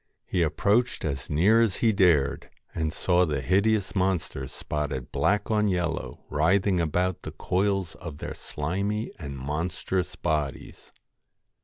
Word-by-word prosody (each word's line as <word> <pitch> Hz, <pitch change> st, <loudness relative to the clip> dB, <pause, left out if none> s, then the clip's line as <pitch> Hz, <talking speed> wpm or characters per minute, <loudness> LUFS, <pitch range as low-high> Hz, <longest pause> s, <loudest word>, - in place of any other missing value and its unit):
He 90 Hz, -, 0 dB
approached 105 Hz, +9 st, +1 dB
as 70 Hz, -4 st, -3 dB
near 100 Hz, +10 st, +4 dB
as 110 Hz, -4 st, +2 dB
he 115 Hz, -, +3 dB
GOLDEN 95 Hz, -2 st, +5 dB
dared, 75 Hz, -5 st, +1 dB, 0.2 s
an( 80 Hz, -1 st, -1 dB
^ -, -, -6 dB
saw 90 Hz, +1 st, +2 dB
^ 75 Hz, -3 st, -1 dB
e -, -, -1 dB
hideous 100 Hz, +7 st, +1 dB
monsters 90 Hz, -8 st, -1 dB
spotted 75 Hz, -4 st, -4 dB
black 105 Hz, +1 st, +1 dB
LOCKS -, -, +3 dB
on 105 Hz, -, +2 dB
yellow 90 Hz, -4 st, -2 dB
writhing 95 Hz, +4 st, +2 dB
about 90 Hz, +2 st, 0 dB
the -, -, -6 dB
coils 95 Hz, -2 st, 0 dB
of 80 Hz, -4 st, -8 dB
their -, -, -5 dB
slimy 100 Hz, +8 st, -3 dB
and 70 Hz, -4 st, -6 dB
monstrous 80 Hz, +6 st, -2 dB
bodies. 75 Hz, -3 st, -3 dB
90 Hz, 155 wpm, -27 LUFS, 75-100 Hz, 0.2 s, GOLDEN